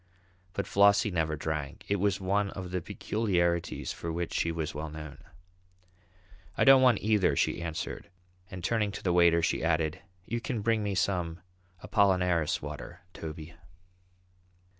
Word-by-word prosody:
But 100 - -2
Flossie 100 +1 +4
never 80 -3 0
drank. 75 -2 -4
It 100 - +1
was 100 0 +1
one 100 +1 0
of 95 -2 -7
the 90 -1 -1
peculiarities 85 -5 -1
for 85 - -5
which 85 +1 -3
she 85 - 0
was 80 -2 -3
well 75 +2 -5
known. 75 -2 -9 1.4
"I - - +3
don't 135 -1 +8
want 125 -5 +4
either," 105 -3 +3
she - - 0
answered, 80 -2 -5 0.4
and 90 -2 -8
turning 105 +1 +1
to - - -7
the 90 - +1
waiter, 85 -1 +5
she - - 0
added, 80 -1 0 0.2
"You 120 +3 -3
can 115 -1 -3
bring 115 0 +2
me 100 -2 -2
some 90 -2 -1 0.4
Apollinaris 90 -5 +2
water, - - -8
Toby." 80 +1 -8
90 Hz, 150 wpm, -29 LUFS, 80-100 Hz, 1.4 s, don't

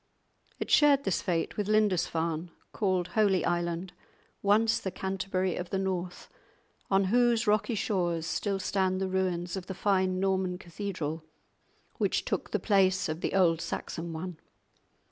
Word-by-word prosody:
It - - -4
shared 285 -2 +5
this 195 - 0
fate 170 -2 -1
with 205 -2 -1
Lindisfarne, 175 -6 +1 0.2
called 185 -4 0
Holy 195 -2 +2
Island, 175 +1 -1 0.5
once 215 +3 +3
the 190 - -3
Canterbury 190 0 -2
of 180 - -5
the 195 - -1
North, 185 -2 -3 0.6
on 195 0 +4
whose 240 -1 +3
rocky 210 +3 +2
shores 175 -6 0
still 195 +3 -1
stand 190 -1 0
the 190 - -1
ruins 180 -2 -1
of 185 -2 -6
the 190 - -5
fine 190 -1 +1
Norman 190 -1 0
cathedral 170 -4 -5 0.8
which - - +1
took - - -2
the - - 0
place 190 -4 +2
of 155 +2 -4
the - - -1
old 165 -4 +3
Saxon 165 +1 -4
one. 165 +1 -6
185 Hz, 145 wpm, -29 LUFS, 175-200 Hz, 0.8 s, shared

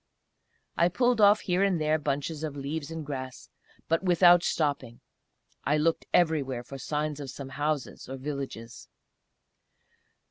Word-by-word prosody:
I 170 - +4
pulled 245 +3 +2
off 205 +1 +6
here 180 0 0
and 195 -4 +2
there 155 0 +1
bunches 145 +2 -3
of 150 -2 -4
leaves 145 +2 -4
and 165 -2 -6
grass, 130 -2 -6 0.4
but 165 0 +1
without 175 -1 +6
stopping. 140 -8 -1 0.6
I 150 +2 +2
looked 165 +2 0
everywhere 145 -8 +1
for 135 +2 -9
signs 150 +1 -2
of 140 -2 -6
some 135 +1 -8
houses 145 -1 -3
or 135 - -5
villages. 135 -4 -6
150 Hz, 140 wpm, -28 LUFS, 135-165 Hz, 0.6 s, off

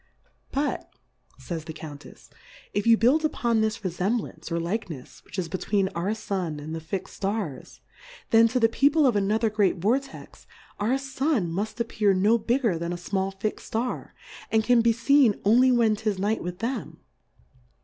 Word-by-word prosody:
But, 285 +2 -2 0.5
jays 165 -4 -5
toe 160 - -6
Couittfi^ 150 -2 -11 0.4
if 205 +2 -1
you 230 -1 +7
build 265 +8 +3
upon 235 -7 +1
this 220 0 0
Refemblance, 185 -2 -2
or 170 - 0
Likencfs, 170 - -5
which - - -11
is 180 -3 -1
be 180 +3 -4
tween 195 -2 +1
our 190 +6 -2
Sun 185 -8 -3
and 155 +2 -7
the 165 - -3
fix'd 185 +4 -5
Stars, 195 - -4 0.5
then, 225 0 +7
to 250 +3 0
the 225 - +5
People 285 +6 +3
of 250 -5 +3
another 210 +2 +1
great 205 -3 +2
Vortex, 255 +9 -3 0.3
our 230 +6 +1
Sun 270 - -1
muft 205 +7 -3
appear 215 -4 +1
no 210 +5 +3
bigger 230 -5 +1
than 170 +1 -3
a - - -2
fmall 190 +2 -3
fixM 215 +1 -2
Star, 235 +3 -4 0.4
and 220 0 +3
can 245 0 +4
be 230 0 +4
ktn 250 -1 +3
only 250 +5 +5
when 230 -3 +3
'tis 210 -2 -2
Night 205 +3 0
with 180 0 -5
them. 230 +3 -4
215 Hz, 170 wpm, -26 LUFS, 185-235 Hz, 0.5 s, you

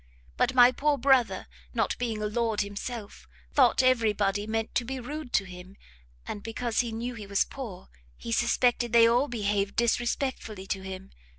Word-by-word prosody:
But 255 +1 +1
my 245 0 +8
poor 290 +3 +1
brother, 265 -2 +3 0.3
not - - +1
being 225 -3 -2
a - - 0
lord 220 0 0
himself, 205 +2 -6 0.3
thought 260 -1 +4
every 235 -4 +3
body 205 0 -1
meant 225 0 -2
to - - +1
be 265 +2 -5
rude 285 +1 -6
to 195 - +3
him, 185 +1 -11 0.5
and 205 - -6
because 225 +1 -2
he 240 -2 0
knew 235 +3 -4
he 215 -3 -9
was 200 0 +2
poor, 235 -10 -8 0.3
he - - -7
suspected 240 0 +2
they 230 -1 +7
all 245 +5 +3
behaved 205 -4 -1
disrespectfully 235 -3 -1
to 195 0 -3
him. 190 0 -8
230 Hz, 175 wpm, -28 LUFS, 205-245 Hz, 0.5 s, my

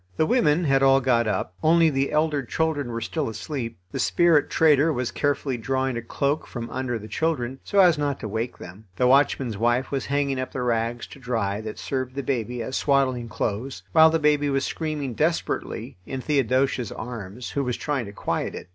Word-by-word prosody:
The 155 - +3
women 175 -7 +3
had 135 -3 +3
all 135 0 +6
got 120 -3 +2
up; 105 - -2
only 165 0 +4
the 135 0 0
elder 150 -1 +1
children 145 +1 -1
were 115 0 -4
still 145 +4 -2
asleep. 115 +1 -5
The - - -4
spirit 170 -4 +3
trader 155 0 +4
was 125 -4 -2
carefully 140 -3 -1
drawing 130 +2 -1
a 120 - -3
cloak 140 +6 -1
from 120 -2 -6
under 130 -2 -2
the 110 -1 -9
children, 135 -3 -2
so 200 - -3
as 175 -5 +5
not 145 -2 -1
to - - -4
wake 110 +3 -3
them. 95 +5 -11
The 125 - +1
watchman's 130 -4 +3
wife 120 +3 +1
was 135 -2 -2
hanging 140 -1 0
up 130 - -4
the 125 - -2
rags 120 0 -1
to - - -13
dry 115 -5 -2
that 110 -1 -7
served 130 -1 -3
the 140 - -3
baby 120 -2 -2
as 130 +4 -3
swaddling 130 -4 +1
clothes, 115 +5 -3
while 160 0 +7
the 165 - +2
baby 150 -1 +2
was 135 -1 0
screaming 150 -5 -3
desperately 160 - -2
in 130 - -4
Theodosia's 130 -3 +1
arms, 115 -1 -7
who 140 - -1
was 125 -2 -2
trying 140 -7 -2
to - - -8
quiet - - -3
it. - - -9
135 Hz, 200 wpm, -24 LUFS, 120-145 Hz, -, while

